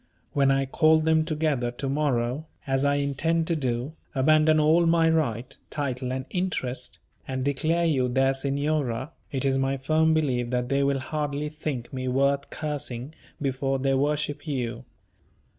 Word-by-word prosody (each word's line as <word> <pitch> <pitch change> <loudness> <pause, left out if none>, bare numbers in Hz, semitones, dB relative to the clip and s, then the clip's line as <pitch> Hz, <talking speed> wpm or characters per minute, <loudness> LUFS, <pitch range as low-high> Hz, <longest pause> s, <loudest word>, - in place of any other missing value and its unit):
When 140 -1 +3
I 135 0 +2
call 155 +3 +4
them 160 0 +3
together 150 -6 0
to 120 +3 -5
morrow, 135 0 0 0.2
as 135 0 +1
I 145 0 +3
intend 145 +4 0
to 170 - 0
do, 130 0 -2 0.2
abandon 155 +3 +4
all 160 +3 +4
my 165 0 +4
right, 130 -7 0
title, 130 -3 -3
and 130 0 -3
interest, 130 -9 -2 0.3
and 130 0 -2
declare 160 +5 +1
you 135 -6 +2
their 135 +2 +2
Signora, 140 -1 -1 0.2
it 135 -1 -1
is 135 0 +2
my 135 +1 0
firm 160 +4 +2
belief 125 -6 0
that 125 0 -1
they 140 +1 +2
will 140 0 +2
hardly 150 +1 -3
think 150 -6 -5
me 130 -1 -3
worth 140 +2 +1
cursing 145 -3 -5 0.3
before 135 -1 -1
they 135 +1 +1
worship 145 +2 -1
you. 125 -3 -3
140 Hz, 160 wpm, -26 LUFS, 130-155 Hz, 0.3 s, call